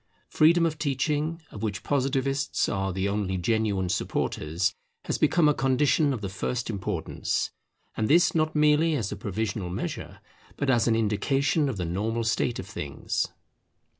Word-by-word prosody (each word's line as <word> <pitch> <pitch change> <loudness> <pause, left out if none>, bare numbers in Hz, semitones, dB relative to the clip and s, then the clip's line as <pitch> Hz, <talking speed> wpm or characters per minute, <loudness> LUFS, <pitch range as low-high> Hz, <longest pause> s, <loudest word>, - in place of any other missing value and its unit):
Freedom 170 +2 +5
of 160 -2 -2
teaching, 150 +3 -1
of 105 - -8
which 105 -2 -3
Positivists 135 0 0
are 95 -2 -1
the 95 +2 -1
only 100 -2 -1
genuine 100 0 0
supporters, 85 -1 -1 0.3
has - - -2
become 165 -3 +4
a 150 - +5
condition 140 +3 +2
of 125 -5 -3
the 100 - -3
first 115 +6 -3
importance: 100 -3 -2 0.4
and 110 - 0
this 170 +7 +5
not 155 -1 +1
merely 150 +2 +4
as 110 -8 -2
a - - -3
provisional 105 -2 -3
measure, 90 - -5 0.4
but 140 -2 +1
as 120 -2 +3
an 115 - +3
indication 135 +8 +1
of 120 - -4
the 90 - -2
normal 110 +7 -1
state 115 +1 0
of - - -5
things. 75 -7 -3
115 Hz, 160 wpm, -27 LUFS, 100-150 Hz, 0.4 s, Freedom